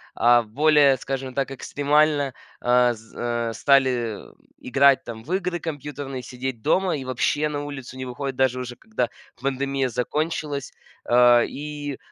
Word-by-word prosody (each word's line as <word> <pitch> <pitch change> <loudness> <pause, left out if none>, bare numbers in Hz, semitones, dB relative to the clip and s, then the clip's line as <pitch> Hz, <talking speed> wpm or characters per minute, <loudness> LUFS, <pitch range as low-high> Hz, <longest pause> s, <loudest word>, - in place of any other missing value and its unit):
а 120 0 +5
более, 145 +4 +4
скажем 135 0 -4
так, 135 0 -1
экстремально, 145 0 +1 0.3
а, 125 0 +4
з 110 0 -16 0.3
а - - -5
стали 125 -4 +2 0.4
играть 135 +1 +4
там 115 -1 -8
в 165 - -5
игры 180 -2 -1
компьютерные, 145 -4 -5
сидеть 125 -1 -5
дома 185 - +2
и 135 - -6
вообще 140 +4 0
на 145 -1 -3
улицу 135 -3 -8
не 130 - -5
выходят, 130 +2 -4
даже 130 -1 +2
уже 125 -1 -6
когда 220 - -2 0.3
пандемия 135 -1 -1
закончилась. 145 +3 -2 0.3
А, 120 0 +6
и 145 -1 -6
135 Hz, 145 wpm, -24 LUFS, 125-145 Hz, 0.4 s, А